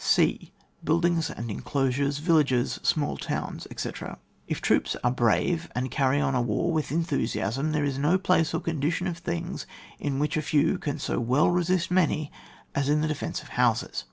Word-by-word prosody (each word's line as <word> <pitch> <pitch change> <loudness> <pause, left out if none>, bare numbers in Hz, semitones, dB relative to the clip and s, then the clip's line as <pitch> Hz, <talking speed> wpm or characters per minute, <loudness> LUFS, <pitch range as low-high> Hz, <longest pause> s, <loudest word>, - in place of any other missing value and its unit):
{e) - - +1 0.3
Buildings 170 +1 +2
and 115 -1 -5
Enclosures, 140 +4 0
Villages, 145 -6 +2
smaU 145 -2 0
Towns, - - -4
etc. - - -5 0.3
If - - -2
troops - - +1
are 125 - +3
brave 130 +8 +1
and 125 0 -2
carry 135 0 +2
on 140 -2 +1
a 125 - +2
war 120 +9 0
with 155 -3 -1
enthusiasm, 140 -3 -1
there 150 -1 +1
is 135 -1 -2
no 155 +6 +3
place 180 -4 +2
or - - -1
con 165 -4 -3
dition 170 +5 0
of 170 -1 -5
thingps 85 -1 -4 0.3
in 140 -2 -2
which 150 +2 0
a - - +1
few 145 -1 +2
can 145 - -3
so - - -2
well 130 +8 +3
resist 180 0 +1
many 155 -4 +2 0.4
as 140 0 0
in 150 +1 +3
the 155 - +1
defence 155 -2 -3
of - - -14
houses. - - +1
145 Hz, 185 wpm, -27 LUFS, 135-165 Hz, 0.4 s, are